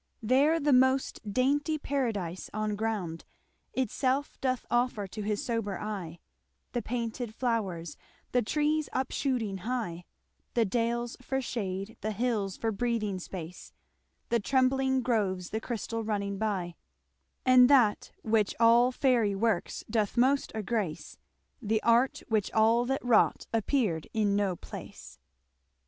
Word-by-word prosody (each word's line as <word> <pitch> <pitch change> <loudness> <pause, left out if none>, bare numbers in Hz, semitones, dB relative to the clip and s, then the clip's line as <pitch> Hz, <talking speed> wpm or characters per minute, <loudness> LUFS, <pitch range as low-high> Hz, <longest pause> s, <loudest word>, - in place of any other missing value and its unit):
There 280 +8 +4
the 290 -2 +2
most 260 +1 +3
daintie 285 +7 +1
paradise 225 - -2
on 215 -1 -1
ground 205 -7 -3 0.5
Itselfe 260 +2 -1
doth 255 -2 -1
offer 240 -4 +1
to 210 +3 -7
his 210 0 -2
sober 225 -5 -2
eye, 190 -6 -5 0.5
The 240 - -1
painted 235 -1 -4
flowres, 195 - -2 0.3
the 250 - +3
trees 300 +5 0
upshooting 250 -6 -1
hye, 180 -6 -3 0.5
The 235 -2 +4
dales 235 +3 -1
for 265 +1 -2
shade, 210 -3 -4
the 215 0 -2
hills 210 -4 -1
for 225 - -1
breathing 215 -3 -1
space, 180 -1 -8 0.6
The 235 - +2
trembling 265 +2 +2
groves, 195 -7 0
the 220 - -2
christall 230 -1 -3
running 200 -2 -2
by; 195 -5 -1 0.7
And 255 -1 +7
that, 245 -7 +4
which 215 -2 +1
all 235 +2 +6
faire 240 -7 +2
works 220 -4 0
doth 215 0 -1
most 270 +3 +3
aggrace, 215 -6 -3 0.4
The 220 -1 +1
art 235 +3 +3
which 215 -3 0
all 225 +2 +4
that 270 0 -2
wrought 235 -3 +3
appeared 220 - 0
in 210 -2 +2
no 200 -3 +1
place. - - -10
225 Hz, 130 wpm, -29 LUFS, 205-255 Hz, 0.7 s, And